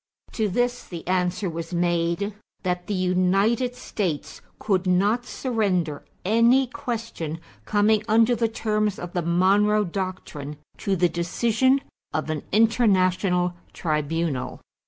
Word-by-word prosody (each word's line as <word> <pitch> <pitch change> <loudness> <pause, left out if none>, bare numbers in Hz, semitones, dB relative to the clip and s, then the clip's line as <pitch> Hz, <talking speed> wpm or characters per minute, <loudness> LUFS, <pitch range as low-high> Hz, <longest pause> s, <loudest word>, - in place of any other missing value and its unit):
To 215 -3 0
this 245 +5 0
the 170 -2 -8
answer 180 +1 0
was 165 +1 -5
made 175 +3 0 0.3
that 180 -1 -2
the 205 - -1
United 195 +7 +2
States 180 -11 -3 0.2
could 195 -3 0
not 205 +7 +2
surrender 190 - -1 0.2
any 230 +6 +4
question 230 - -5 0.3
coming 210 0 +3
under 225 +2 +4
the 230 0 +1
terms 215 -2 0
of 175 0 -7
the 175 - 0
Monroe 195 +5 +3
Doctrine 180 -6 -5 0.2
to 195 - 0
the 175 0 +3
decision 230 - +1 0.3
of 155 +1 -1
an 155 -2 -2
international 190 -5 +3 0.2
tribunal. 155 -2 -2
190 Hz, 120 wpm, -24 LUFS, 175-220 Hz, 0.3 s, any